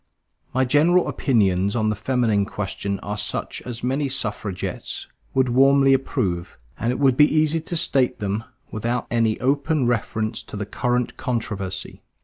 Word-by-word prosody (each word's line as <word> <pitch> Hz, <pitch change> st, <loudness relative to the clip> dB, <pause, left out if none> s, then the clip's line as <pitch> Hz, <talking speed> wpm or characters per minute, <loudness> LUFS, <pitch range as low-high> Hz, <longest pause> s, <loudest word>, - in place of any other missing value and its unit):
My 130 Hz, +1 st, +2 dB
general 160 Hz, +7 st, +4 dB
opinions 100 Hz, -6 st, +1 dB
on 110 Hz, -2 st, +1 dB
the -, -, -1 dB
feminine 110 Hz, -4 st, +1 dB
question 100 Hz, 0 st, -3 dB
are 105 Hz, 0 st, -4 dB
such -, -, -3 dB
as 120 Hz, -1 st, -5 dB
many 135 Hz, +3 st, 0 dB
suffragists 105 Hz, -7 st, -3 dB, 0.3 s
would 130 Hz, -1 st, +3 dB
warmly 135 Hz, +2 st, +5 dB
approve; 90 Hz, -10 st, -1 dB, 0.2 s
and 115 Hz, -, 0 dB
it 125 Hz, -, -2 dB
would 135 Hz, -3 st, +3 dB
be 150 Hz, +3 st, +5 dB
easy 155 Hz, +1 st, +3 dB
to 170 Hz, +2 st, -3 dB
state 135 Hz, -5 st, +2 dB
them 105 Hz, +2 st, -2 dB, 0.3 s
without 120 Hz, +3 st, -2 dB
any 115 Hz, -2 st, +1 dB
open 140 Hz, +2 st, +1 dB
reference 110 Hz, -2 st, -1 dB
to -, -, -9 dB
the 105 Hz, -, -3 dB
current 125 Hz, +3 st, -1 dB
controversy. 100 Hz, -6 st, -4 dB
120 Hz, 150 wpm, -23 LUFS, 105-135 Hz, 0.3 s, warmly